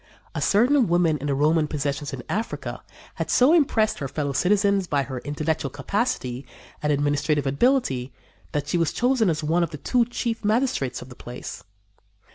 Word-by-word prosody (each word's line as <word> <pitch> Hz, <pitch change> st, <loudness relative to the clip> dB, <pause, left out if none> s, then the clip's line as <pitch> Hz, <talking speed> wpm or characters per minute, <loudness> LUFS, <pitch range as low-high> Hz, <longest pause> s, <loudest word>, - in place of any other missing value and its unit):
A -, -, -3 dB
certain 245 Hz, +4 st, +4 dB
woman 170 Hz, -3 st, +2 dB
in 145 Hz, -, -4 dB
the 140 Hz, -, +1 dB
Roman 155 Hz, +2 st, +3 dB
possessions 145 Hz, -1 st, -3 dB
in 130 Hz, -3 st, -6 dB
Africa 220 Hz, +3 st, -3 dB, 0.4 s
had -, -, -2 dB
so 260 Hz, +6 st, +5 dB
impressed 235 Hz, -10 st, +2 dB
her 140 Hz, -, -3 dB
fellow 140 Hz, 0 st, -3 dB
citizens 200 Hz, +4 st, +2 dB
by 140 Hz, -3 st, +1 dB
her 130 Hz, -1 st, -5 dB
intellectual 150 Hz, +1 st, -2 dB
capacity 140 Hz, -, -2 dB, 0.4 s
and 150 Hz, -, +1 dB
administrative 145 Hz, 0 st, +1 dB
ability 135 Hz, -, +1 dB, 0.4 s
that 145 Hz, -1 st, -2 dB
she 170 Hz, -, 0 dB
was 165 Hz, -3 st, +1 dB
chosen 245 Hz, -5 st, +2 dB
as 155 Hz, -1 st, -1 dB
one 165 Hz, +4 st, +2 dB
of 170 Hz, -, +1 dB
the 155 Hz, -, -7 dB
two 240 Hz, -, +2 dB
chief 235 Hz, -1 st, -3 dB
magistrates 210 Hz, -, 0 dB
of 125 Hz, -, -14 dB
the 125 Hz, -, -11 dB
place. 125 Hz, 0 st, -8 dB
155 Hz, 175 wpm, -24 LUFS, 140-215 Hz, 0.4 s, so